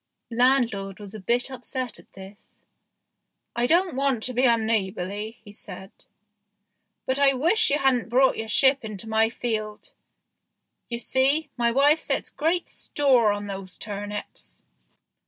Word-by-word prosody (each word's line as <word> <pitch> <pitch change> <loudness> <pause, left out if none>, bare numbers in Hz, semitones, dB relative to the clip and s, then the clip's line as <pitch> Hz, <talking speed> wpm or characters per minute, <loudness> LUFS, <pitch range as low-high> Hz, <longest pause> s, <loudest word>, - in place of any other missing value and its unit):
Landlord 230 -6 +1
was 205 -2 -9
a 215 - -7
bit 240 +6 0
upset 255 -1 -4
at - - -20
this. 195 +2 -14 0.5
" - - -55
I 240 +1 +1
don't 350 +3 +3
want 265 -4 0
to 255 - -3
be 250 +2 +2
unneighbourly," 215 -2 -1
he 205 - -12
said, 190 -1 -10 0.6
" 205 +1 -53
but 260 +1 -1
I 275 -1 +4
wish 335 - +3
you 285 - +2
hadn't 265 -5 +1
brought 260 +3 +4
your 225 - -5
ship 265 +4 +4
into 215 0 -7
my 220 0 +2
field. 215 -3 -4 1.0
You 235 - -3
see, 270 +6 +1
my 235 -1 +1
wife 285 +5 +4
sets - - -3
great 330 +3 -1
store 255 -7 +2
on 205 0 -3
these 195 -2 -8
turnips." 205 0 -7
235 Hz, 150 wpm, -25 LUFS, 205-265 Hz, 1.0 s, I